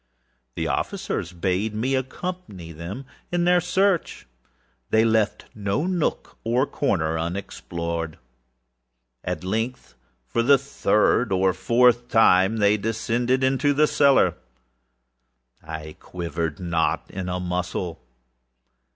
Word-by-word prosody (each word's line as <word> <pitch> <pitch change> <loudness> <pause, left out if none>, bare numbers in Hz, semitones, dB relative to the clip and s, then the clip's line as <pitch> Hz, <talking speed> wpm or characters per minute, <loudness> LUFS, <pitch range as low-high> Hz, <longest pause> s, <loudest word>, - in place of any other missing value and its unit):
The - - -2
officers 85 - -2
bade 95 +4 -1
me 125 +5 0
accompany 130 - -4
them 85 - -7 0.3
in 175 0 +1
their 180 0 +4
search. 185 +1 0 0.6
They 110 +1 +4
left 110 -2 +1
no 100 +8 -1
nook 180 -3 -2
or 120 +4 +2
corner 80 - 0
unexplored. 85 -2 -4 1.1
At 90 -2 -3
length, 110 - -3 0.3
for 115 - 0
the 140 +4 +6
third 125 -4 +1
or 95 0 +3
fourth 120 +2 +3
time, 105 -2 +4
they 105 0 +4
descended 120 +4 0
into 135 +2 +2
the 150 +2 +4
cellar. 140 -2 +4 1.3
I 80 -1 -8
quivered 85 -3 -4
not 85 -3 -1
in 90 -1 -4
a 90 0 -2
muscle. 90 -1 -3
105 Hz, 110 wpm, -24 LUFS, 90-130 Hz, 1.3 s, the